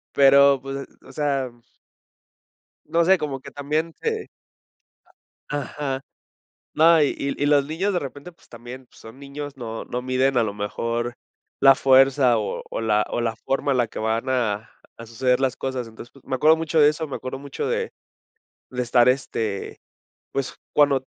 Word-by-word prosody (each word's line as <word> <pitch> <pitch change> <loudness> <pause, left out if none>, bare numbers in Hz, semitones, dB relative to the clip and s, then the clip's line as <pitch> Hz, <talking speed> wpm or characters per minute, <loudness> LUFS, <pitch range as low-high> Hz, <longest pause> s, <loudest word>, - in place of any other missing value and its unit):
pero 140 0 +6
pues, 135 +1 -6 0.2
o - - -14
sea 135 -3 -1 1.4
no 170 0 +2
sé 190 +3 +5
como 145 -5 -4
que - - -10
también 155 +3 -2
te 450 - -3 1.2
ajá, 140 -1 -3 0.7
no, 160 +1 +6
y 145 - +2
y 140 0 -3
y - - +3
los 145 -1 +4
niños 185 +6 -1
de 180 - +1
repente, 145 +4 -8
pues, 170 - -26
también 120 +2 -10
son 115 +4 -14
niños, 140 0 -8
no 115 -3 -6
no 125 - -4
miden 130 +1 +1
a 120 - +4
lo 105 -2 -3
mejor 115 +3 -3 0.5
la 135 0 +7
fuerza 130 -2 +5
o 105 - -4
o - - -4
la 105 -1 +2
o - - -1
la 115 -1 -1
forma 135 +4 -1
en 130 - +2
la 120 -2 +2
que - - -8
van 110 +3 -1
a 115 -5 -1 0.3
a 115 - -8
suceder 125 +3 +1
las 130 -1 0
cosas, 130 -3 -4
entonces, 115 +1 -12
pues, 135 - -20
me 135 - -5
acuerdo 155 +5 +5
mucho 160 0 0
de 145 -1 +7
eso, 155 +1 -3
me 140 - -5
acuerdo 130 +1 -6
mucho 140 0 -5
de - - -1 0.8
de 125 -1 -3
estar, 120 0 +4
este, 115 -6 -2 0.6
pues, 135 -1 -3 0.2
cuando 140 -3 +3
135 Hz, 175 wpm, -23 LUFS, 120-145 Hz, 1.4 s, la